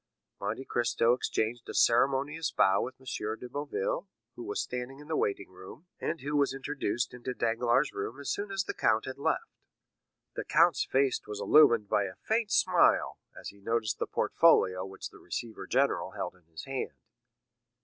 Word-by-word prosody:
Monte 110 +6 -3
Cristo 120 -1 +2
exchanged 120 -1 -2
a - - -5
ceremonious 140 +6 +2
bow 95 -10 +3
with 130 +1 -4
M. 130 - -19 0.3
de 125 - -7
Boville, 450 - -3 0.3
who - - -7
was 410 +4 -3
standing 125 +2 -4
in 150 +1 -13
the 160 - -1
waiting 100 -5 -1
room, 95 - -12
and 165 - -3
who 145 +2 -3
was 140 -2 +2
introduced 135 -4 -2
into 125 +1 -5
Danglars' 120 +4 +1
room 110 +7 -5
as 145 - -3
soon 205 0 -3
as 195 -1 -1
the - - -4
count 110 - +2
had 130 +1 -7
left. - - -2 0.7
The - - -4
count's - - +3
serious 135 -1 +3
face - - -27
was 105 -1 -5
illumined 120 -6 +5
by 100 - +2
a 95 -1 -7
faint 220 -1 -1
smile, - - +3 0.2
as - - -7
he 100 0 -16
noticed 115 0 -1
the - - -1
portfolio 95 0 +3
which 95 - -8
the - - -16
receiver 115 -2 -6
general - - +1
held - - -4
in 90 -2 -26
his 80 -1 -10
hand. 135 -1 -4
125 Hz, 180 wpm, -30 LUFS, 110-145 Hz, 0.7 s, illumined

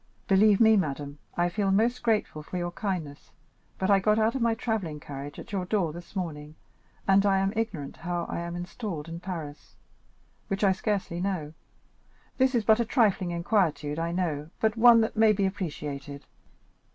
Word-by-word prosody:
"Believe 200 +1 +5
me, 220 -1 +6
madame, 145 -4 -3 0.2
I 175 0 +3
feel 195 +2 -1
most 225 +6 +2
grateful 215 -9 0
for 175 +4 -6
your 175 0 -2
kindness, 175 -7 -4 0.5
but 190 +1 +1
I 200 - +6
got 210 +2 +2
out 220 +1 +2
of 265 - -3
my 230 -1 +2
travelling 215 -10 -3
carriage 145 0 -8
at - - -10
your 195 -3 -1
door 180 -5 0
this 175 +4 -11
morning, 155 -5 -5 0.5
and 195 0 +5
I 195 -1 +3
am 195 +1 +1
ignorant 200 -11 -3
how 175 0 -3
I - - -4
am 170 0 -5
installed 175 -2 -5
in 165 0 -6
Paris, 165 -5 -7 0.7
which 195 +1 -2
I 195 - +5
scarcely 190 -3 -2
know; 180 -6 -2 0.9
this 260 0 +3
is 230 - +2
but 220 +2 +5
a - - +3
trifling 215 -7 +2
inquietude, 170 -5 0
I 165 +1 -1
know, 160 -4 -2
but 220 0 +1
one 230 0 +7
that 220 - -1
may 220 -1 +5
be 200 -1 0
appreciated." 145 -7 -5
185 Hz, 180 wpm, -27 LUFS, 160-215 Hz, 0.9 s, one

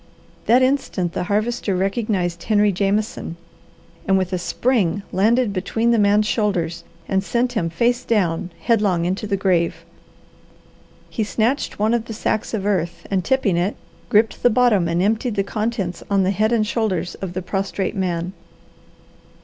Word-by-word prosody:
That 245 +3 +5
instant 255 - 0
the 180 - -2
Harvester 215 0 0
recognized 190 -3 -1
Henry 210 -2 +3
Jameson, 200 -1 -1 0.7
and 190 0 +4
with 185 -1 -1
a 180 - 0
spring 205 -1 0
landed 225 +3 +2
between 225 +5 0
the 230 - +3
man's 205 +1 +4
shoulders 185 -7 -1 0.2
and 190 0 +1
sent 240 +4 0
him, 170 -8 0
face 235 +8 +1
down, 180 -5 0
headlong 205 -7 +2
into 190 +4 -2
the 200 -1 0
grave. 170 -3 0 1.3
He 225 - -1
snatched 225 +7 -1
one 215 +2 +1
of 235 -1 0
the 225 - -6
sacks 220 0 -1
of 200 -2 -3
earth, 180 -5 -1
and 190 -2 +1
tipping 205 -6 +1
it, 180 +4 0 0.3
gripped 215 0 +2
the 245 - +5
bottom 220 -6 +3
and 170 +2 +1
emptied 225 +3 0
the 200 - +1
contents 210 -4 -3
on 200 -1 +3
the 185 - +2
head 215 +3 +1
and 225 -2 +2
shoulders 190 -6 -1
of 190 -2 -4
the 185 0 -4
prostrate 195 +2 -2
man. 180 -1 -2
200 Hz, 160 wpm, -21 LUFS, 185-225 Hz, 1.3 s, That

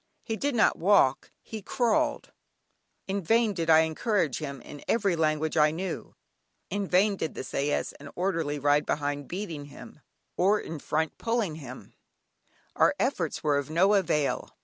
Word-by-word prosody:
He 225 - -3
did 280 +3 -1
not 225 - +3
walk, 170 -8 +3
he 220 -1 -7
crawled. 285 +8 0 0.8
In 195 +1 -1
vain 225 +4 +2
did 165 -3 -3
I 160 0 +7
encourage 160 - 0
him 140 -3 -5
in 145 - -11
every 200 -6 +2
language 155 -1 0
I 150 0 +6
knew, 180 +5 -5 0.6
in 200 -1 -2
vain 195 +3 +3
did 160 - -3
the - - -5
sais 140 +3 -1
and 140 0 -10
orderly 165 -5 -1
ride 145 +1 +2
behind 145 -1 -2
beating 170 -6 -5
him, 145 +1 -13 0.4
or 200 +4 +3
in 160 -1 -6
front 160 +2 -2
pulling 230 -7 0
him, 130 -4 -10 0.8
our 295 - +4
efforts 190 - -1
were 145 -2 +2
of 145 0 -6
no 185 +6 +3
avail. 155 -7 +1
165 Hz, 160 wpm, -28 LUFS, 150-205 Hz, 0.8 s, I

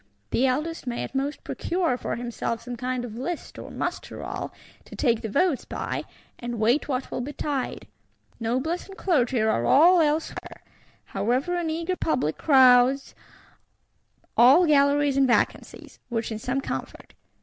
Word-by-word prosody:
The 265 - +2
Eldest 305 +3 -2
may 240 -1 -2
at - - -7
most 275 +2 -2
procure 345 -6 -1
for - - -4
himself 235 -1 -4
some 245 0 -6
kind 250 +1 -3
of 230 0 -8
List 335 +5 -5
or - - -8
Muster - - -4
roll, - - -5 0.3
to - - -11
take 235 -5 +1
the 220 - -4
votes 290 - +1
by, - - -4 0.3
and 240 -1 -4
wait 235 +7 +2
what 260 -2 -3
will - - -3
betide. 285 0 -3 0.5
Noblesse 260 +10 -2
and 390 - -11
Clergy 265 -9 +1
are 220 - +1
all 340 - +6
elsewhere: 310 +1 -2 0.4
however, 245 - -1
an 345 -2 -1
eager 335 +3 -2
public 255 - -1
crowds 260 -1 +5 1.2
all 270 +10 +7
galleries 285 -2 +3
and 270 -1 +4
vacancies; 240 - -1
which 230 -1 -2
is 215 0 -5
some 260 +3 -1
comfort. - - -6
265 Hz, 150 wpm, -25 LUFS, 240-305 Hz, 1.2 s, all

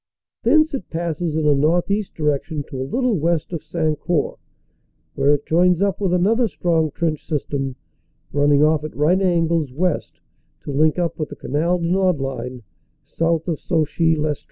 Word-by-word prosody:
Thence 310 0 +3
it 265 -10 -5
passes 165 -1 -2
in 160 -1 0
a 150 - +5
northeast 175 +8 +1
direction 150 0 -1
to 130 - -5
a 130 - -4
little 250 -7 +1
west 165 +2 0
of 165 - -3
Sancourt, 155 -1 -1 0.7
where 140 - +3
it 145 - -7
joins 175 +1 +3
up 200 0 0
with 190 -3 +1
another 215 +7 +2
strong 160 -2 0
trench 155 0 -2
system, 140 -3 -2 0.6
running 145 0 +4
off 155 -1 +3
at 155 - -7
right 170 +6 +3
angles 165 -5 +1
west 170 +4 -2 0.4
to - - -6
link 155 +4 +2
up 175 -2 -2
with 155 - -2
the - - -8
Canal 165 +6 0
du 170 -1 -2
Nord 185 -3 +2
line 130 -2 -5 0.4
south 165 0 -1
of 165 -4 -1
Sauchy 165 -1 +1
Lestree. 150 -1 -1
160 Hz, 170 wpm, -21 LUFS, 150-175 Hz, 0.7 s, a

